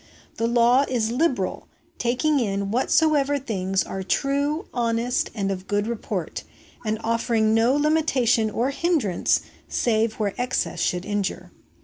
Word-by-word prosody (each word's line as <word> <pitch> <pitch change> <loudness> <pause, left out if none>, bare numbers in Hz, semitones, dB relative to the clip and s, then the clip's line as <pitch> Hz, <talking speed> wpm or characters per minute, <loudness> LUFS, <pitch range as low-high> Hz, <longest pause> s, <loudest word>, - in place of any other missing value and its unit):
The 230 - +1
law 240 +3 +4
is 230 -3 0
liberal, 250 - -1 0.3
taking 265 +5 +1
in 200 -3 -1
whatsoever 290 +3 +2
things 195 -7 -1
are 190 - -5
true, 285 - 0
honest, 235 0 0
and 195 -2 -1
of 190 0 -5
good 205 0 0
report, 230 -1 -4 0.4
and 215 -1 -1
offering 225 -1 +1
no 230 +4 +3
limitation 285 -7 +2
or 240 +5 -1
hindrance 280 - +1 0.3
save 225 -1 +1
where 205 -3 -2
excess 250 -7 -1
should 180 +1 -1
injure. 205 -2 -3
235 Hz, 130 wpm, -24 LUFS, 210-275 Hz, 0.4 s, law